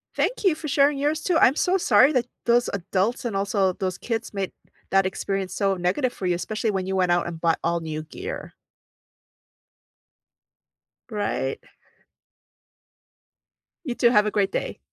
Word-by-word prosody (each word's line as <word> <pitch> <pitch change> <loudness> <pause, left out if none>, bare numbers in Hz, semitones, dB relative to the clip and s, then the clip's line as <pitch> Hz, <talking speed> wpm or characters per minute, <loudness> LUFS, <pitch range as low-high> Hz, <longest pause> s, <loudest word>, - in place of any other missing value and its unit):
Thank - - -1
you 375 -6 +4
for 315 0 -7
sharing 285 0 +3
yours 295 +2 0
too, 345 0 +1
I'm 270 -3 +5
so 365 +4 +2
sorry 290 -6 +5
that 250 -3 +2 0.2
those 240 +1 +3
adults, 200 +5 -1
and 225 -4 -2
also 195 -1 +1
those 185 0 -3
kids 225 -2 -4
made 195 -2 -3 0.4
that 195 0 +3
experience 190 0 -2
so 195 -2 +1
negative 190 +9 0
for 190 - -6
you, 180 -1 +2
especially 215 +5 -2
when 190 -2 -2
you 190 - -1
went 180 -2 +2
out 175 0 +2
and 170 -1 -6
bought 165 -1 +2
all 170 0 0
new 155 -1 -4
gear. 385 - -7 2.6
Right. 205 - -2 2.3
You 250 -4 -3
too, 240 - +4
have 210 -3 +4
a 210 - 0
great 200 -2 +1
day. - - -3
205 Hz, 160 wpm, -24 LUFS, 185-250 Hz, 2.6 s, I'm